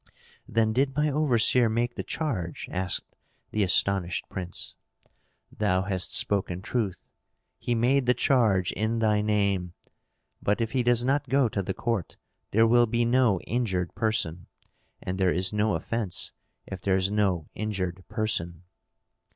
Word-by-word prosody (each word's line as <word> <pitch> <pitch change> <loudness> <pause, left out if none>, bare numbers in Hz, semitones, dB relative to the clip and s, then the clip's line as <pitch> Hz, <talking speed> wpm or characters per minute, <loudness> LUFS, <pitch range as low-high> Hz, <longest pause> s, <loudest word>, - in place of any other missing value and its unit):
"Then 110 -1 +1
did 135 +3 +1
my 150 0 +2
overseer 125 -4 +3
make 120 +2 0
the - - -4
charge?" 100 - -3
asked 90 -1 -3 0.4
the 110 - 0
astonished 95 -1 +1
prince. 90 -2 -5 0.8
"Thou 95 -3 +1
hast 95 -2 0
spoken 95 -2 0
truth. 110 -6 -2 0.5
He 120 - -1
made 125 +3 +2
the 125 - +4
charge 110 -9 +2
in 110 +3 -1
thy 105 -2 +2
name. 100 -4 0 0.7
But 105 +3 +1
if 115 -1 -1
he 130 - +1
does 120 0 +3
not 140 0 0
go 135 -1 +3
to 100 - -2
the 95 0 -4
court, 115 -7 -2 0.3
there 110 +2 +4
will 120 +1 +4
be 120 +1 +1
no 120 -5 +3
injured 95 -7 -1
person; 90 -6 -1 0.6
and 95 +1 -4
there 95 -2 +3
is 90 +2 0
no 105 0 +1
offence 110 -6 -1 0.3
if 95 -2 -7
there 95 -1 +2
is 95 +1 0
no 95 -6 0
injured 95 -4 -3
person." 85 -6 -2
105 Hz, 150 wpm, -27 LUFS, 95-120 Hz, 0.8 s, the